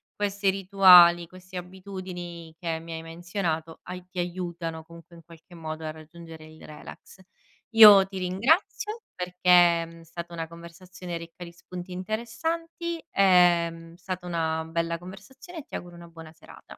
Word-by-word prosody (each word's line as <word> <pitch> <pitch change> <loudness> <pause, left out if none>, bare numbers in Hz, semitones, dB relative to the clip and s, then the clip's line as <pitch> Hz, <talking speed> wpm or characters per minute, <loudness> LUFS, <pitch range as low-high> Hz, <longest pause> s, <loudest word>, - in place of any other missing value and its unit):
questi 200 -1 0
rituali, 180 -3 +6
questi 185 +1 -15
abitudini 180 -3 -8
che 165 -2 -3
mi 165 0 -11
hai 160 - -5
menzionato 165 -1 -4
hai 180 0 -8
ti 185 - -5
aiutano, 170 -2 -4
comunque, 170 +1 -15
in 165 - -15
qualche 170 +2 -17
modo 160 -1 -7
a 155 - -3
raggiungere 160 0 -13
il 155 0 -16
relax. 155 +4 -13 0.6
Io 210 -3 +10
ti 195 0 -7
ringrazio, 315 - 0
perché 180 0 -7 0.4
è, - - -3
uhm, 165 0 -15
stata 170 +1 -9
una 165 -1 -5
conversazione 170 +1 -9
ricca 170 +1 -10
di 170 - -10
spunti 180 +1 -10
interessanti, 325 - -4
ehm, 175 -3 +4
mhmm, 165 0 -13
stata 180 0 -6
una 160 -2 -1
bella 165 0 -2
conversazione 255 - -11
e 285 - -11
ti - - -27
auguro 175 0 -8
una 170 0 -12
buona 165 -1 -12
serata. 160 - -16
175 Hz, 155 wpm, -26 LUFS, 165-190 Hz, 0.6 s, Io